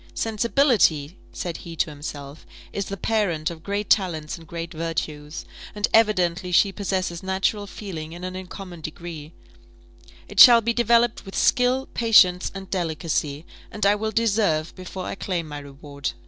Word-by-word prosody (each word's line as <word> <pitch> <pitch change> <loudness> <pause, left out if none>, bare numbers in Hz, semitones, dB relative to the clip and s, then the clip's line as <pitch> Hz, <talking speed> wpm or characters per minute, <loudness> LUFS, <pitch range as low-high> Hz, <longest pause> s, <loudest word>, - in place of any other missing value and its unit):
"Sensibility," 220 - +2
said 175 -2 -5
he 170 -1 -9
to 160 0 0
himself, 145 0 -8 0.3
"is 200 - -2
the 195 - -5
parent 180 -7 0
of 165 -1 -10
great 200 +3 -3
talents 165 -6 +1
and 165 -1 -14
great 170 -1 -6
virtues; 155 -2 -4 0.3
and 210 0 +1
evidently 185 -5 +2
she 195 +3 +4
possesses 185 -4 -2
natural 190 +2 -1
feeling 170 -6 -7
in 175 +2 -9
an 185 0 -5
uncommon 185 -2 -8
degree: 155 -1 -8 1.0
it - - -4
shall 240 -2 +11
be 235 +1 0
developed 235 0 +2
with 195 - -10
skill, 255 +2 +2
patience, 195 -6 +4
and 195 -1 -8
delicacy; 160 -4 -2 0.2
and 210 -1 -2
I 200 - +6
will 215 +1 -2
deserve 205 -8 +1
before 185 0 -7
I - - -4
claim 180 -4 -3
my 145 -1 -6
reward." 140 +1 -6
180 Hz, 155 wpm, -24 LUFS, 160-210 Hz, 1.0 s, shall